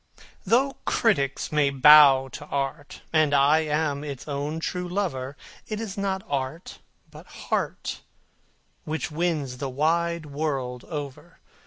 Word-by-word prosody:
Though 265 +6 +2
critics 140 - 0
may 150 -2 +3
bow 140 -1 +7
to 145 +3 -9
art, 140 +1 -4
and 155 -2 +3
I 140 +3 +5
am 150 -2 -1
its 140 -2 -7
own 145 +2 -3
true 180 +2 -3
lover, 145 -8 -3 0.3
It 215 -1 -4
is 220 -4 -5
not 195 -1 -2
art, 140 +4 -4 0.3
but - - -13
heart, - - -3 0.8
which 160 +1 -4
wins 150 -6 -2
the 135 - -3
wide 165 +4 0
world 140 -4 -3
over. 145 -5 -7
150 Hz, 130 wpm, -25 LUFS, 140-170 Hz, 0.8 s, bow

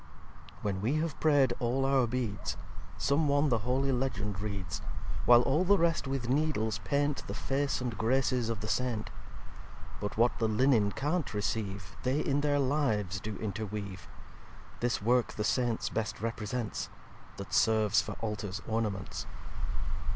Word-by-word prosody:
xvi - - -20
"When 95 -2 -1
we 120 +8 +1
have 155 -1 -1
prayed 145 -4 +4
all 130 +2 +1
our 135 -2 +3
Beads, 115 -5 -2 0.4
Some 145 +2 +2
One 145 +1 +3
the 115 -3 +2
holy 130 +4 +1
Legend 105 -6 -1
reads; 100 -7 -4 0.5
While 120 0 +8
all 155 +8 +2
the 200 +2 +5
rest 165 -4 +1
with 135 -3 -2
Needles 125 -7 +1
paint 145 0 0
The - - -4
Face 135 0 0
and 120 -3 -2
Graces 125 0 +1
of 115 -2 -2
the 110 - -4
Saint. 120 -2 -1 0.9
But 105 +1 -4
what 120 +2 +3
the 115 - +2
Linnen 110 -2 +3
can't 150 - -1
receive 100 -3 -2
They 130 +3 +1
in 145 -1 +1
their 145 -1 +2
Lives 130 -9 +1
do 105 +2 -5
interweave. 100 -3 -4 0.7
This 120 -3 0
Work 120 +1 +3
the 105 - -2
Saints 120 0 +1
best 110 -2 -2
represents; 115 0 -3 0.5
That 100 - -7
serves 110 -2 +4
for - - -5
Altar's 105 -3 -3
Ornaments. 110 -4 -2
120 Hz, 150 wpm, -31 LUFS, 105-135 Hz, 0.9 s, While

